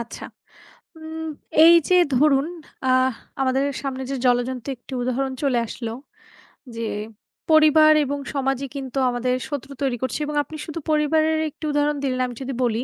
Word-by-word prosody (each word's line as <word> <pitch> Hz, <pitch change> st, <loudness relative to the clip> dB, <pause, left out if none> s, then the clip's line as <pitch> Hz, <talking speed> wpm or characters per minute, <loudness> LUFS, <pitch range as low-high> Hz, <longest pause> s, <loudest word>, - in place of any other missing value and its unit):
আচ্ছা। 235 Hz, -, -8 dB, 0.7 s
উম 320 Hz, 0 st, -6 dB, 0.4 s
এই 335 Hz, +1 st, +9 dB
যে 365 Hz, -, +5 dB, 0.2 s
ধরুন 280 Hz, +1 st, +4 dB, 0.4 s
অ্যাহ 255 Hz, 0 st, +3 dB, 0.3 s
আমাদের 265 Hz, +1 st, +1 dB, 0.2 s
সামনে 265 Hz, -1 st, -4 dB
যে 275 Hz, -, -1 dB
জলজ্যন্ত 245 Hz, 0 st, +1 dB
একটি 245 Hz, -, -16 dB
উদাহরণ 260 Hz, +2 st, -1 dB
চলে 270 Hz, -4 st, +2 dB
আসলো 225 Hz, 0 st, -5 dB, 0.8 s
যে 230 Hz, -1 st, -3 dB, 0.6 s
পরিবার 310 Hz, 0 st, +6 dB
এবং 285 Hz, +1 st, -2 dB, 0.2 s
সমাজই 270 Hz, -1 st, -1 dB
কিন্তু 270 Hz, -1 st, -5 dB
আমাদের 250 Hz, +1 st, 0 dB
শত্রু 285 Hz, -2 st, -5 dB
তৈরি 260 Hz, -3 st, 0 dB
করছে 260 Hz, +2 st, -2 dB
এবং 295 Hz, 0 st, -4 dB
আপনি 315 Hz, -, -11 dB
শুধু 320 Hz, +1 st, -6 dB
পরিবারের 310 Hz, +1 st, +2 dB
একটি 310 Hz, +2 st, -9 dB
উদাহরণ 295 Hz, 0 st, +1 dB
দিলেন 255 Hz, -2 st, 0 dB
আমি 245 Hz, -, -8 dB
যদি 270 Hz, +1 st, -4 dB
বলি। 235 Hz, 0 st, 0 dB
270 Hz, 155 wpm, -23 LUFS, 255-300 Hz, 0.8 s, এই